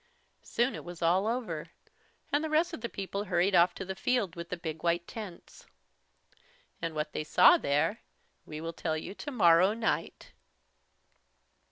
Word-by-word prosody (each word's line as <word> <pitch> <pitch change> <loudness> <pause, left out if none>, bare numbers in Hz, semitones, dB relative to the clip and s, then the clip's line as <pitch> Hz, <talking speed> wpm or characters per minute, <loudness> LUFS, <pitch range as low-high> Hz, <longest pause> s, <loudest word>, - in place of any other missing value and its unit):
Soon 240 +3 0
it - - -7
was 175 -1 -8
all 185 +5 +3
over, 220 -10 -3 0.6
and 290 +2 +2
the 315 - -2
rest 320 +3 +2
of 285 - -6
the 235 - -3
people 200 +1 -4
hurried 180 +1 +1
off 175 0 +5
to 190 - -6
the 190 - -4
field 205 -3 0
with 170 0 -7
the 180 - -3
big 160 -2 -6
white 170 0 0
tents. 210 -6 -10 1.1
And 165 -1 -3
what 150 0 -3
they - - -2
saw 250 - +6
there 160 - +1 0.4
we 150 - -8
will 165 +1 -4
tell 160 -1 -2
you 160 - -6
tomorrow 195 - +3
night. 230 -1 -2
180 Hz, 165 wpm, -30 LUFS, 165-225 Hz, 1.1 s, saw